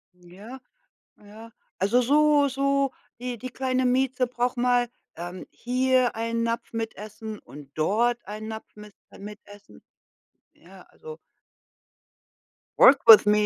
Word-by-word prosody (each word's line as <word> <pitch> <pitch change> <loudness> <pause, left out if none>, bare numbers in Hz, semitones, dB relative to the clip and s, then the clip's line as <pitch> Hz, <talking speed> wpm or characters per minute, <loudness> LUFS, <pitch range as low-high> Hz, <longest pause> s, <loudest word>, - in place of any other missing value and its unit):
Ja, 195 +9 -13 0.6
ja. 215 +2 -14 0.3
Also, 205 +6 +2
so 290 +2 +3
so 275 0 0 0.3
die 245 -2 -5
die 255 +2 -7
kleine 255 0 -1
Mieze 255 0 +1
braucht 245 +1 -2
mal, 245 0 +1 0.3
ähm, 175 +2 -8
hier 255 0 0
einen 230 +1 -2
Napf 230 0 -3
mit 225 -1 -4
Essen 215 +1 -9
und 140 -1 -14
dort 235 +9 0
einen 215 +2 -7
Napf 220 0 -7
mit 210 -1 -13 0.2
mit 210 +1 -10
Essen. 205 0 -16 0.7
Ja, - - -17
also 470 0 -12 1.6
work 270 0 +8
with 220 -2 +10
me. 210 0 +3
235 Hz, 130 wpm, -25 LUFS, 210-255 Hz, 1.6 s, with